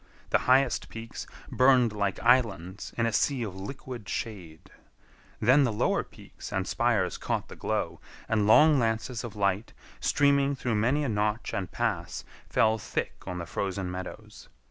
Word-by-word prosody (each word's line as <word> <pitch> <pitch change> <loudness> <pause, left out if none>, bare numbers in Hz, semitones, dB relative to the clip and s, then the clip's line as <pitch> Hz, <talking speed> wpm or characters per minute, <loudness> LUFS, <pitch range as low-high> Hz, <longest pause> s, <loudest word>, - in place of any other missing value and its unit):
The - - +4
highest 135 +2 +3
peaks 115 0 -8 0.2
burned 130 -3 +4
like 100 -2 -1
islands 110 -7 +1
in 115 - +2
a 115 - 0
sea 130 +3 +1
of 100 -4 -5
liquid 110 +1 -7
shade. 90 -9 -6 0.7
Then 130 +6 +5
the 125 - +1
lower 105 - +1
peaks - - -12
and 95 0 -1
spires 115 -6 +1
caught - - -2
the - - -9
glow, - - -2 0.3
and 105 -2 +1
long 150 +6 +7
lances 115 +1 -1
of 115 -4 -7
light, 100 +1 0 0.3
streaming 140 -1 +3
through 125 -3 -2
many 125 +8 +2
a 140 - -1
notch 105 +1 -1
and 95 -2 -3
pass, - - -2 0.3
fell 110 0 +3
thick - - -3
on 90 - -4
the 85 - -4
frozen 95 +2 -3
meadows. 90 0 -8
110 Hz, 160 wpm, -28 LUFS, 100-125 Hz, 0.7 s, long